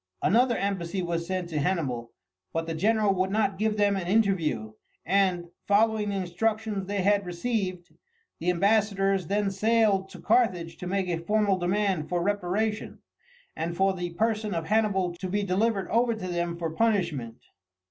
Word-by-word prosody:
Another 240 Hz, +3 st, +3 dB
embassy 190 Hz, -2 st, -2 dB
was 170 Hz, -1 st, -2 dB
sent 185 Hz, -2 st, -2 dB
to 155 Hz, -3 st, -2 dB
Hannibal, 135 Hz, -9 st, -1 dB, 0.4 s
but 165 Hz, 0 st, -1 dB
the 165 Hz, -, -3 dB
general 210 Hz, +4 st, +2 dB
would 190 Hz, 0 st, 0 dB
not 195 Hz, -2 st, 0 dB
give 215 Hz, 0 st, 0 dB
them 205 Hz, -1 st, +3 dB
an 185 Hz, -3 st, -3 dB
interview, 180 Hz, -, +1 dB, 0.3 s
and, 185 Hz, -1 st, +2 dB, 0.2 s
following 215 Hz, 0 st, +3 dB
the 200 Hz, -, -2 dB
instructions 200 Hz, +2 st, -1 dB
they 200 Hz, -1 st, -1 dB
had 200 Hz, +1 st, +3 dB
received, 185 Hz, -1 st, -3 dB, 0.5 s
the 170 Hz, -, -1 dB
ambassadors 195 Hz, -1 st, +2 dB
then 200 Hz, +1 st, 0 dB
sailed 205 Hz, -1 st, +2 dB
to -, -, -11 dB
Carthage 190 Hz, -8 st, +1 dB
to 180 Hz, -, -6 dB
make 190 Hz, 0 st, -1 dB
a 170 Hz, -2 st, -1 dB
formal 205 Hz, +1 st, +1 dB
demand 185 Hz, -2 st, 0 dB
for 175 Hz, -1 st, 0 dB
reparation, 205 Hz, +2 st, -1 dB, 0.6 s
and 170 Hz, +1 st, -3 dB
for 195 Hz, 0 st, +3 dB
the 175 Hz, -2 st, -5 dB
person 215 Hz, -1 st, 0 dB
of 165 Hz, -1 st, -2 dB
Hannibal 200 Hz, -3 st, +1 dB
to 185 Hz, +2 st, -6 dB
be 205 Hz, +2 st, 0 dB
delivered 195 Hz, +1 st, 0 dB
over 235 Hz, +1 st, +2 dB
to 190 Hz, -4 st, -6 dB
them 170 Hz, -1 st, -2 dB
for 165 Hz, -2 st, -3 dB
punishment. 170 Hz, -, 0 dB
195 Hz, 165 wpm, -27 LUFS, 175-210 Hz, 0.6 s, Another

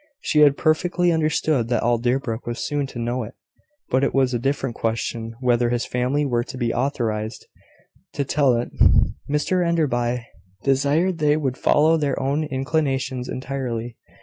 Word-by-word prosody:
He 150 Hz, -, +1 dB
had 145 Hz, -2 st, +6 dB
perfectly 175 Hz, +2 st, +2 dB
understood 155 Hz, -5 st, +1 dB
that 120 Hz, -1 st, 0 dB
all 120 Hz, 0 st, +2 dB
Deerbrook 120 Hz, -1 st, -1 dB
was 120 Hz, -, -3 dB
soon 145 Hz, -2 st, -2 dB
to 130 Hz, -, -10 dB
know 120 Hz, +2 st, -2 dB
it; 110 Hz, -, -8 dB, 0.6 s
but 130 Hz, +2 st, +2 dB
it 140 Hz, -, 0 dB
was 130 Hz, -2 st, +2 dB
a 120 Hz, -, 0 dB
different 135 Hz, 0 st, -1 dB
question 115 Hz, 0 st, -3 dB
whether 120 Hz, -1 st, +2 dB
his 120 Hz, 0 st, -1 dB
family 130 Hz, +4 st, 0 dB
were 120 Hz, -3 st, 0 dB
to 130 Hz, -, -9 dB
be 120 Hz, -2 st, -1 dB
authorised 115 Hz, -4 st, -2 dB, 0.7 s
to 140 Hz, -, -2 dB
tell 135 Hz, -2 st, +2 dB
it. 120 Hz, +1 st, -2 dB, 0.6 s
Mr 150 Hz, +5 st, +1 dB
Enderby 125 Hz, -8 st, 0 dB, 0.4 s
desired 145 Hz, +6 st, +1 dB
they 150 Hz, 0 st, +3 dB
would 135 Hz, -4 st, -1 dB
follow 155 Hz, +4 st, +3 dB
their 145 Hz, -3 st, -1 dB
own 140 Hz, +3 st, 0 dB
inclinations 135 Hz, -2 st, -1 dB
entirely. 125 Hz, -3 st, -4 dB
130 Hz, 160 wpm, -22 LUFS, 120-150 Hz, 0.7 s, had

